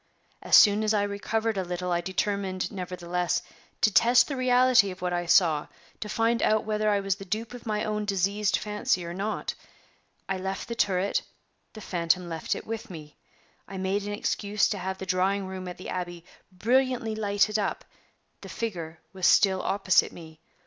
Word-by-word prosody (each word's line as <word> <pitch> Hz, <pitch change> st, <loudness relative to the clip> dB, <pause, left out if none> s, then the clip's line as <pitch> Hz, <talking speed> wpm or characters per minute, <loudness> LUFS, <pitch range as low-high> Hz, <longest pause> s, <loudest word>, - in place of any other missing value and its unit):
As -, -, +4 dB
soon 210 Hz, 0 st, +7 dB
as 215 Hz, 0 st, +2 dB
I 205 Hz, -, +2 dB
recovered 210 Hz, +1 st, -1 dB
a -, -, -1 dB
little, 180 Hz, 0 st, -4 dB
I 175 Hz, 0 st, +1 dB
determined, 190 Hz, 0 st, -2 dB
nevertheless, 180 Hz, -2 st, -2 dB, 0.4 s
to 215 Hz, -, +3 dB
test 240 Hz, +4 st, +5 dB
the 280 Hz, -, -3 dB
reality 250 Hz, -4 st, +4 dB
of 185 Hz, 0 st, -8 dB
what 180 Hz, -1 st, -1 dB
I 175 Hz, 0 st, -2 dB
saw; 160 Hz, -4 st, +4 dB, 0.3 s
to 210 Hz, -, -5 dB
find 230 Hz, +2 st, +1 dB
out 215 Hz, 0 st, +2 dB
whether 215 Hz, 0 st, 0 dB
I 205 Hz, -1 st, +2 dB
was 195 Hz, -1 st, -1 dB
the 195 Hz, -, -9 dB
dupe 220 Hz, +5 st, -4 dB
of 245 Hz, -2 st, -10 dB
my 210 Hz, -1 st, -1 dB
own 210 Hz, 0 st, -2 dB
diseased 200 Hz, +1 st, +1 dB
fancy 210 Hz, -3 st, -1 dB
or 170 Hz, -, -5 dB
not. 200 Hz, +4 st, -3 dB, 0.7 s
I 195 Hz, -1 st, -2 dB
left 190 Hz, +1 st, -4 dB
the 235 Hz, -, -4 dB
turret; 195 Hz, -3 st, +1 dB, 0.5 s
the 215 Hz, -, -10 dB
phantom 175 Hz, -1 st, 0 dB
left 165 Hz, -2 st, -2 dB
it -, -, -7 dB
with 225 Hz, +2 st, -5 dB
me. 155 Hz, -4 st, -10 dB, 0.5 s
I 195 Hz, -, -7 dB
made 190 Hz, +2 st, -1 dB
an 205 Hz, -, -3 dB
excuse 205 Hz, 0 st, 0 dB
to 205 Hz, -, -3 dB
have 190 Hz, +1 st, -4 dB
the 190 Hz, -, -6 dB
drawing 190 Hz, +2 st, +1 dB
room 185 Hz, -1 st, -6 dB
at 180 Hz, -, -7 dB
the 185 Hz, -, -8 dB
Abbey 175 Hz, -2 st, -5 dB, 0.3 s
brilliantly 240 Hz, +3 st, +1 dB
lighted 210 Hz, 0 st, +1 dB
up; 205 Hz, -, -2 dB, 0.6 s
the -, -, -10 dB
figure 170 Hz, -8 st, -5 dB
was 185 Hz, -2 st, +1 dB
still 190 Hz, -3 st, +4 dB
opposite 195 Hz, -2 st, +2 dB
me. 160 Hz, -2 st, -12 dB
195 Hz, 185 wpm, -27 LUFS, 180-215 Hz, 0.7 s, soon